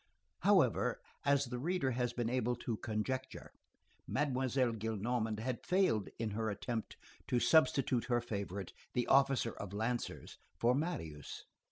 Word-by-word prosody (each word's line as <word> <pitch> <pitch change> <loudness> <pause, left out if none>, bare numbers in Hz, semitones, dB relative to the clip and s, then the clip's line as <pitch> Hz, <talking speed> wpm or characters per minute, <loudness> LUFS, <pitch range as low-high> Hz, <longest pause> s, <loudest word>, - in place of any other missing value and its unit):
However, - - +3 0.3
as 140 0 +4
the 125 0 -4
reader 160 -2 0
has 125 0 0
been 120 -1 -2
able 125 0 +1
to 115 -2 -3
conjecture, 130 +6 -3 0.6
Mademoiselle 130 -3 +1
Gillenormand 110 0 -1
had 120 +1 -3
failed 180 - +2
in 110 -2 -2
her 110 +1 -1
attempt 110 +2 -4 0.3
to 125 - +2
substitute 135 -5 +4
her 120 -1 +2
favorite, 100 -5 -4 0.2
the 125 - +1
officer 135 -3 +4
of 100 -1 -7
lancers, 115 +3 -3 0.2
for 120 +1 +3
Marius. 105 - -4
120 Hz, 135 wpm, -35 LUFS, 110-130 Hz, 0.6 s, as